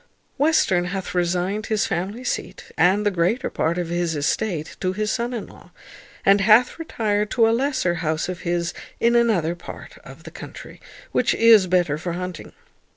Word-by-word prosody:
Western 275 - +2
hath 190 0 -4
resigned 180 +4 -1
his 215 -1 +1
family 195 +8 -3
seat, - - -5
and 195 +4 +3
the 205 - +3
greater 185 +7 0
part 165 +2 -1
of 175 -2 -2
his 175 -1 -1
estate, 155 +2 -2
to 185 0 -1
his 210 +2 -1
son 240 0 -2
in 235 -4 -4
law, - - -16 0.6
and 200 0 +5
hath 220 +8 +4
retired 210 -9 -1
to 230 -1 +3
a - - +3
lesser 260 -7 0
house 160 -2 -2
of 180 -1 -5
his 175 0 -2 0.3
in 235 +1 +3
another 210 -9 +2
part 175 - -11
of - - -14
the - - -10
country, - - -11 0.3
which - - +1
is 225 -4 +6
better 175 -5 +1
for 170 +1 -4
hunting. 180 -1 -6
185 Hz, 175 wpm, -22 LUFS, 175-225 Hz, 0.6 s, is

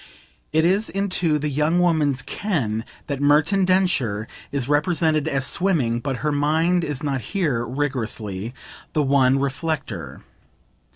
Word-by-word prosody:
It 160 +1 +3
is 195 +5 +2
into 185 -5 0
the 150 +1 -2
young 150 +4 +1
woman's 150 -7 +2
"ken" 120 - -2 0.2
that 140 -2 -4
Merton 155 +7 +3
Densher 145 - +1 0.2
is 135 -3 -2
represented 155 0 +2
as 135 -4 0
swimming; 145 -13 +1
but 135 0 -3
her 150 - +2
mind 160 +5 +2
is 150 -2 -3
not 135 -3 -1
here, 150 - -1
rigorously, 115 -6 -3 0.4
the 150 - +2
one 135 -1 +4
reflector. 140 - -3
145 Hz, 130 wpm, -22 LUFS, 130-165 Hz, 0.4 s, one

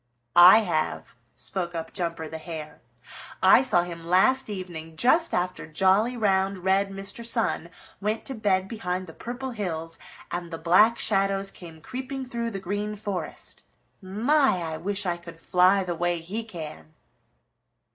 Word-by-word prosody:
"I 180 +5 +9
have," 170 -7 -2 0.2
spoke 175 -2 -5
up 165 0 -5
Jumper 170 -3 -3
the 160 +1 -7
Hare. 155 -2 -8 0.6
"I 190 +6 +8
saw 215 -10 +2
him 170 -1 -8
last 205 +10 +3
evening 170 -5 -7
just 325 - +4
after 180 +1 -2
jolly, 190 +9 +2
round, 195 -2 +1
red 195 +1 +2
Mr. 195 +4 -6
Sun 230 -7 0 0.3
went 215 +2 -2
to 270 - -3
bed 195 -5 +1
behind 185 -4 -3
the 160 - -11
Purple 250 +6 -6
Hills 165 -7 -4 0.3
and 175 -1 -4
the 165 - -5
Black 185 +8 +4
Shadows 195 -1 0
came 165 -3 -12
creeping 260 - -5
through 235 -2 -3
the 195 -3 -5
Green 205 +3 -3
Forest. 200 -6 -5 0.4
My, 225 - +2
I - - -4
wish 200 +3 -2
I 175 -1 0
could 170 -1 -12
fly 185 +3 +4
the 180 -1 -3
way 175 0 -1
he 195 +8 -5
can!" 160 -5 -9
190 Hz, 155 wpm, -26 LUFS, 170-215 Hz, 0.6 s, I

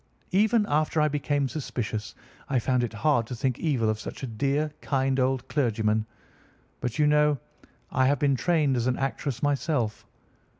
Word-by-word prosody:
Even 210 +3 +3
after 155 -1 +1
I 150 - +4
became 145 -1 0
suspicious, 120 -7 -4 0.3
I 135 - +1
found 125 +1 +1
it 120 - -2
hard 115 0 +1
to 125 - -5
think 125 +1 -1
evil 135 -9 +1
of 110 0 0
such - - -7
a - - 0
dear, 140 +6 -1
kind 135 -1 0
old 130 0 0
clergyman. 110 -5 +1 0.7
But, 125 -2 -3
you 150 - +4
know, 150 0 +4 0.5
I 130 0 +3
have 140 +1 +3
been 140 0 +2
trained 150 -1 +2
as 120 0 0
an 125 - +1
actress 135 -1 -3
myself. 140 -6 0
135 Hz, 170 wpm, -27 LUFS, 120-150 Hz, 0.7 s, I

